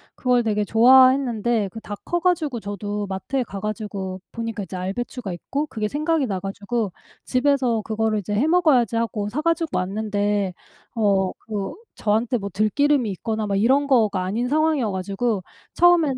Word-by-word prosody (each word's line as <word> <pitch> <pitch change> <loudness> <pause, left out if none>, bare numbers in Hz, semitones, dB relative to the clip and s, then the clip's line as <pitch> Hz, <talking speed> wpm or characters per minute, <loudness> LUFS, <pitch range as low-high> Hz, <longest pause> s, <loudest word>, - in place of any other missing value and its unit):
그걸 250 -1 +2
되게 210 -2 0
좋아했는데 240 -1 +4
그 225 - -9
다 205 - -7
커 345 - -1
가지고 330 -8 0
저도 205 0 -4
마트에 200 +7 -2
가 200 -4 -7
가지고 200 -3 -4
보니까 230 -3 -4
이제 190 0 -8
알배추가 195 +2 -4
있고 280 - -3
그게 215 -6 -3
생각이 305 +3 0
나 195 -6 -2
가지고 200 +2 -3 0.3
'집에서 255 -3 +2
그거를 220 0 0
이제 205 +1 -4
해 230 +9 +2
먹어야지.' 305 - +3
하고 220 -3 -1
사 265 +8 -2
가지고 330 0 0
왔는데 205 0 -1 0.4
어 200 -4 +2
그 205 -3 -5 0.2
저한테 225 +4 +1
뭐 200 -2 -5
들기름이 230 +5 +2
있거나 215 +3 -3
막 200 -1 -1
이런 265 +7 +3
거가 220 -8 +2
아닌 220 +7 -1
상황이어 300 -5 +1
가지고 195 +2 -2 0.3
처음에는 335 -6 +4
220 Hz, 360 characters per minute, -23 LUFS, 205-260 Hz, 0.4 s, 좋아했는데